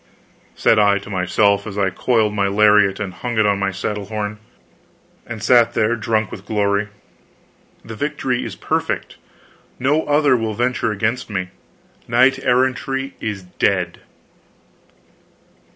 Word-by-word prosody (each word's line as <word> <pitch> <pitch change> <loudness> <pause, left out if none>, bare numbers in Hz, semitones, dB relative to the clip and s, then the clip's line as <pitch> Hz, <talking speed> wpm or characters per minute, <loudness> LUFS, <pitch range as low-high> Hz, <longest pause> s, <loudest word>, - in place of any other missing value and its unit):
Said 110 - +3
I 100 -1 +4
to 100 +1 -9
myself, 100 +2 +1
as 100 -1 -7
I 95 -2 +1
coiled 110 +1 +1
my 100 -1 +1
lariat 105 -1 +4
and 100 -3 -4
hung 120 +6 -5
it 110 - +4
on 100 -1 +2
my 100 0 0
saddle 100 +1 -4
horn, 105 0 -4 0.9
and 110 -3 -7
sat 120 -2 +4
there 110 +2 +2
drunk 110 -2 -1
with 100 +2 -10
glory, 100 -1 0 1.0
"The 115 - -8
victory 135 -1 -2
is - - -6
perfect - - -3 0.6
no 145 +5 +1
other 145 -2 +3
will 110 -3 -2
venture 120 -1 0
against 110 +4 -2
me 95 -3 -3 0.6
knight 130 +3 +3
errantry 135 +2 0
is 105 -3 -4
dead." 90 -1 -1
105 Hz, 135 wpm, -19 LUFS, 100-120 Hz, 1.0 s, I